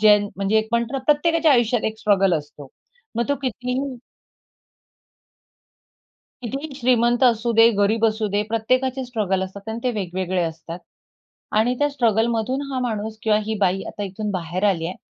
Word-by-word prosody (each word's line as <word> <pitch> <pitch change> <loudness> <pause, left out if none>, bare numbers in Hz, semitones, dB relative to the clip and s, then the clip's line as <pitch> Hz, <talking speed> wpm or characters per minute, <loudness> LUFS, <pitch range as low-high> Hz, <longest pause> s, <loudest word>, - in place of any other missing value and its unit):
ज्यां 210 -1 +7 0.2
म्हणजे 195 +2 +1
एक 220 0 -2
म्हणतो 235 +1 0
ना, 270 - -1
प्रत्येकाच्या 320 +1 +3
आयुष्यात 240 -2 +2
एक 220 0 -2
स्ट्रगल 195 -4 +3
असतो. 145 -1 -12 0.5
मग 235 +3 0
तो 285 - +2
कितीही 250 0 -2 2.6
कितीही 275 +4 -5
श्रीमंत 240 -1 +2
असू 235 -1 +2
दे, 225 - +9
गरीब 220 +3 +2
असू 220 0 0
दे. 205 +1 0
प्रत्येकाचे 255 +4 0
स्ट्रगल 210 -6 -1
असतात 200 +3 -8
आणि 225 +1 -4
ते 250 - +2
वेगवेगळे 185 -1 -2
असतात 165 +1 -6 0.8
आणि 245 +3 +2
त्या 290 - +2
स्ट्रगलमधून 235 +1 0
हा 265 - -2
माणूस 220 0 -4
किंवा 215 -1 +3
ही 220 +1 -2
बाई, 195 -1 +1
आता 205 - -6
इथून 205 +2 -4
बाहेर 180 +1 -3
आली 165 -4 -2
आहे 180 - -6
220 Hz, 160 wpm, -22 LUFS, 195-245 Hz, 2.6 s, दे